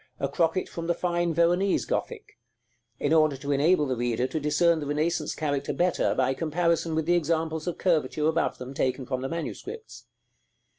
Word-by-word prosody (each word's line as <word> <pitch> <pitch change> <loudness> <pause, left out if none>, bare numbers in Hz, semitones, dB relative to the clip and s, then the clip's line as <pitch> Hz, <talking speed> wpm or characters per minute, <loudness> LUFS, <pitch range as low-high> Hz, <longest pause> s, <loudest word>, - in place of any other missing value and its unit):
a 140 - 0
crocket 165 +5 0
from 165 0 -6
the 170 - +1
fine 175 -1 0
Veronese 175 +4 +2
Gothic; - - -4 0.6
in 145 - +1
order 155 -3 +4
to 140 +2 -4
enable 150 +3 +3
the 130 -2 -1
reader 120 0 0
to 155 +4 -2
discern 160 +3 +2
the 145 - -5
Renaissance 155 +2 -1
character 145 -2 -2
better 180 0 +1
by 130 0 +2
comparison 165 +1 0
with 160 -1 0
the 175 - +3
examples 160 -1 0
of 175 - -2
curvature 155 -4 +1
above 160 +1 0
them, 130 +1 -8
taken 130 -1 -1
from 130 -1 -3
the 135 - -3
manuscripts. 395 - -7
160 Hz, 180 wpm, -27 LUFS, 140-170 Hz, 0.6 s, order